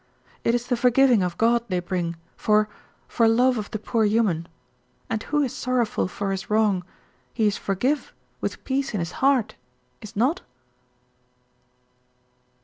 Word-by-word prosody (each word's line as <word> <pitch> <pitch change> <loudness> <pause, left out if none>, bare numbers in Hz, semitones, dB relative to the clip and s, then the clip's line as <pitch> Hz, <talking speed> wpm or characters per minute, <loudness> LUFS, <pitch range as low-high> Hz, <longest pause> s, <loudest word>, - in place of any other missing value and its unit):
It 230 - +2
is 240 0 -2
the 245 - 0
forgiving 250 -1 +4
of 180 -1 -2
God 235 +1 +3
they 185 -2 0
bring 175 -1 -2 0.2
for 210 0 +2 0.4
for 230 - +2
love 245 +2 +3
of 210 - -5
the 220 - -3
poor 220 +1 0
human, 205 -6 +1 0.6
and 220 -1 -1
who 295 +3 0
is 260 - -2
sorrowful 250 -4 0
for 195 +2 -3
his 195 0 -4
wrong 210 -4 +2 0.5
he 225 - +2
is 205 -1 +2
forgive 250 +10 -1 0.3
with - - -4
peace 270 -3 -1
in - - 0
his 170 0 -3
heart, 265 -4 +3 0.5
is 215 - -10
not?" 255 +10 +1
225 Hz, 150 wpm, -24 LUFS, 200-250 Hz, 0.6 s, forgiving